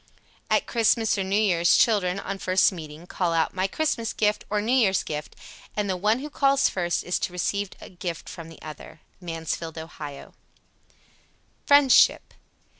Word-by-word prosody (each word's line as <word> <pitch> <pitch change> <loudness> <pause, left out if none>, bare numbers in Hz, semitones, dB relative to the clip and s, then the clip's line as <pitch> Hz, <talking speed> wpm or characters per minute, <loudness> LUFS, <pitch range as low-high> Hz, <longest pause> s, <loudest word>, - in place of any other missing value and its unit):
At - - +2
Christmas 225 -1 +2
or 195 - -1
New 195 +2 +1
Year's 175 -5 +3
children, 195 -4 +2
on 195 0 -5
first 185 +2 +3
meeting, 160 -2 -9
call 180 -1 -1
out 165 -1 +1
"My 185 +1 0
Christmas 230 -2 -1
gift," 210 0 0
or 210 - 0
"New 220 +4 0
Year's 200 -7 +3
gift," 150 0 -6 0.4
and 210 -1 0
the 190 - -1
one 210 +5 +1
who 300 - -6
calls 275 -1 +3
first 175 -2 -1
is 180 - -1
to - - -2
receive 200 +2 -2
a - - -12
gift 175 -2 -6
from 165 -2 -9
the 165 - -14
other. 155 +1 -10 0.2
Mansfield, 165 -1 -5
O. 160 +1 -7 1.8
FRIENDSHIP. 285 -3 +5
190 Hz, 165 wpm, -25 LUFS, 170-215 Hz, 1.8 s, FRIENDSHIP